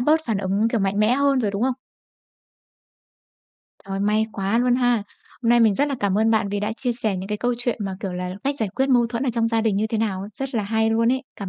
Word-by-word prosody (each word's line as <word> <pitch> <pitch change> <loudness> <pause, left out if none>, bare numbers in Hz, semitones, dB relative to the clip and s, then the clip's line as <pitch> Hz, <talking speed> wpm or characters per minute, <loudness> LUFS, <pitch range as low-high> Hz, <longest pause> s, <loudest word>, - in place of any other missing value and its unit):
bớt 305 +5 +3
phản 220 -4 0
ứng, 200 +3 +1
kiểu, 230 - 0
mạnh 195 +1 0
mẽ 215 +3 +4
hơn 280 0 +2
rồi, 210 -4 0
đúng 200 +3 -3
không? 260 -1 +1 2.1
Trời, 195 0 -4
may 210 +2 +2
quá 200 +3 0
luôn 245 0 +3
ha! 245 -3 +2 0.4
Hôm 230 - 0
nay 240 0 +5
mình 220 -3 +4
rất 285 +6 +1
là 280 - -1
cảm 200 0 +1
ơn 225 +1 +3
bạn 215 -2 +2
vì 205 0 -2
đã 210 +1 -1
chia 245 +1 -2
sẻ 220 -5 -2
những 190 +1 -6
cái 210 0 -2
câu 245 +1 0
chuyện 245 -1 -2
mà 190 -1 -4
kiểu 190 -3 -4
là 180 0 -4
cách 280 +1 +1
giải 220 - -1
quyết 265 +7 -1
mâu 245 -3 +4
thuẫn 235 +2 -3
ở 260 - +1
trong 230 -1 +1
gia 225 -1 +1
đình 220 -3 +1
như 215 +2 +1
thế 220 0 -2
nào, 195 -3 -2
rất 270 -2 -5
là 215 - +1
hay 220 +2 +1
luôn 230 +2 +3
ấy. 260 +1 -1
Cảm 200 -2 -5
225 Hz, 270 wpm, -23 LUFS, 200-245 Hz, 2.1 s, nay